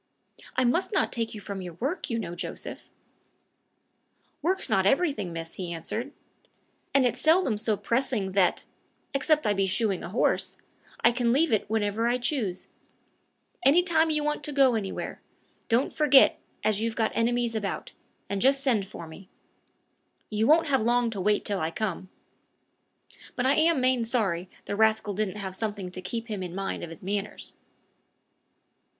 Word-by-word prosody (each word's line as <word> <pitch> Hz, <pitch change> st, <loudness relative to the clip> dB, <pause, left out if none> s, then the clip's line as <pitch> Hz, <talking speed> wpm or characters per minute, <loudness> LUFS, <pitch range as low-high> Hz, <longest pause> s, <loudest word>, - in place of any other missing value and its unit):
"I 255 Hz, -, +2 dB
must 335 Hz, -, +1 dB
not 390 Hz, -, +1 dB
take 230 Hz, -2 st, -3 dB
you 210 Hz, -, -7 dB
from 200 Hz, -1 st, -5 dB
your 175 Hz, -2 st, -7 dB
work, 280 Hz, -, -3 dB
you 230 Hz, -, -1 dB
know, 175 Hz, -6 st, -4 dB
Joseph." 175 Hz, -, -7 dB, 1.5 s
"Work's 370 Hz, +5 st, +1 dB
not 190 Hz, 0 st, +2 dB
everything, 270 Hz, -, +1 dB
miss," 165 Hz, 0 st, -5 dB
he 180 Hz, -2 st, -5 dB
answered; 215 Hz, -, -4 dB, 0.8 s
"and 275 Hz, -2 st, +4 dB
it's 245 Hz, -, 0 dB
seldom 315 Hz, -, +4 dB
so 210 Hz, 0 st, 0 dB
pressing 230 Hz, -1 st, 0 dB
but -, -, -9 dB
that 190 Hz, -2 st, +2 dB, 0.5 s
except 300 Hz, +1 st, +2 dB
I 210 Hz, -, +3 dB
be 195 Hz, -1 st, +1 dB
shoeing 195 Hz, -1 st, 0 dB
a -, -, -5 dB
horse 215 Hz, -, 0 dB, 0.4 s
I -, -, +6 dB
can 240 Hz, -1 st, +1 dB
leave 290 Hz, +2 st, +3 dB
it 210 Hz, -, 0 dB
when 220 Hz, -1 st, +1 dB
I 225 Hz, +4 st, +1 dB
choose. 240 Hz, -, -2 dB, 1.0 s
Any 295 Hz, +7 st, +6 dB
time 325 Hz, -2 st, +3 dB
you 305 Hz, -1 st, 0 dB
want 300 Hz, 0 st, -1 dB
to 295 Hz, -, -4 dB
go 275 Hz, -3 st, +4 dB
anywhere, 205 Hz, -4 st, -4 dB, 0.5 s
don't 240 Hz, +3 st, +2 dB
forget 285 Hz, -3 st, +5 dB, 0.2 s
as 215 Hz, -1 st, +2 dB
you've 225 Hz, 0 st, -1 dB
got 220 Hz, -2 st, +1 dB
enemies 235 Hz, 0 st, +1 dB
about, 210 Hz, -3 st, -3 dB, 0.4 s
and 200 Hz, -1 st, -2 dB
just 275 Hz, +1 st, +4 dB
send 225 Hz, -8 st, +1 dB
for 170 Hz, -4 st, -9 dB
me. 185 Hz, +4 st, -12 dB, 1.0 s
You 215 Hz, +1 st, +1 dB
won't 320 Hz, 0 st, +5 dB
have 270 Hz, -4 st, +3 dB
long 240 Hz, 0 st, +2 dB
to 200 Hz, -4 st, -4 dB
wait 210 Hz, +2 st, +2 dB
till 200 Hz, -2 st, -1 dB
I 160 Hz, -, -1 dB
come. 185 Hz, 0 st, -3 dB, 1.3 s
But 250 Hz, -, -1 dB
I 265 Hz, -, +4 dB
am 320 Hz, -1 st, +3 dB
main 255 Hz, -1 st, +2 dB
sorry 195 Hz, -7 st, -1 dB, 0.2 s
the -, -, -3 dB
rascal 220 Hz, -1 st, +2 dB
didn't 210 Hz, 0 st, -2 dB
have 190 Hz, -2 st, -5 dB
something 205 Hz, -4 st, -4 dB
to 185 Hz, -, -6 dB
keep 230 Hz, +5 st, -4 dB
him 210 Hz, -4 st, -4 dB
in 180 Hz, -1 st, -5 dB
mind 195 Hz, 0 st, -3 dB
of 170 Hz, -, -6 dB
his 165 Hz, +1 st, -11 dB
manners." 200 Hz, +2 st, -3 dB
220 Hz, 170 wpm, -27 LUFS, 195-260 Hz, 1.5 s, I